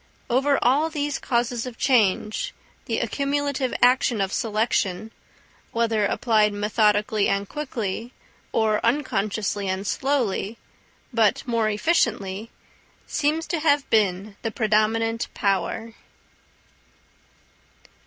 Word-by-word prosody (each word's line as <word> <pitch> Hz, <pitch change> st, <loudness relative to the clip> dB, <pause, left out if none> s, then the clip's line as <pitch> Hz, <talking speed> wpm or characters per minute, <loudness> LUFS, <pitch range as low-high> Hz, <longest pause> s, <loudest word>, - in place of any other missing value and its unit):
Over 275 Hz, +3 st, +3 dB
all 285 Hz, +6 st, +3 dB
these 295 Hz, -2 st, -2 dB
causes 240 Hz, 0 st, -1 dB
of 245 Hz, -2 st, -8 dB
change, 215 Hz, -5 st, +1 dB, 0.3 s
the -, -, -1 dB
accumulative 280 Hz, -2 st, -1 dB
action 250 Hz, -2 st, +4 dB
of 195 Hz, 0 st, -1 dB
selection, 220 Hz, -2 st, 0 dB, 0.6 s
whether 225 Hz, -3 st, +1 dB
applied 215 Hz, -3 st, +2 dB
methodically 210 Hz, 0 st, +2 dB
and 200 Hz, 0 st, 0 dB
quickly, 235 Hz, -5 st, -4 dB, 0.4 s
or 220 Hz, -1 st, +1 dB
unconsciously 215 Hz, -5 st, 0 dB
and 190 Hz, +1 st, -2 dB
slowly, 230 Hz, -5 st, -1 dB, 0.6 s
but 230 Hz, +3 st, +2 dB
more 230 Hz, -2 st, +1 dB
efficiently, 215 Hz, -, 0 dB, 0.6 s
seems 310 Hz, +3 st, 0 dB
to 340 Hz, -, 0 dB
have 290 Hz, -2 st, +2 dB
been 200 Hz, -1 st, +1 dB
the 225 Hz, -, -2 dB
predominant 225 Hz, +1 st, +1 dB
power. 200 Hz, +4 st, -1 dB
225 Hz, 100 wpm, -24 LUFS, 210-260 Hz, 0.6 s, action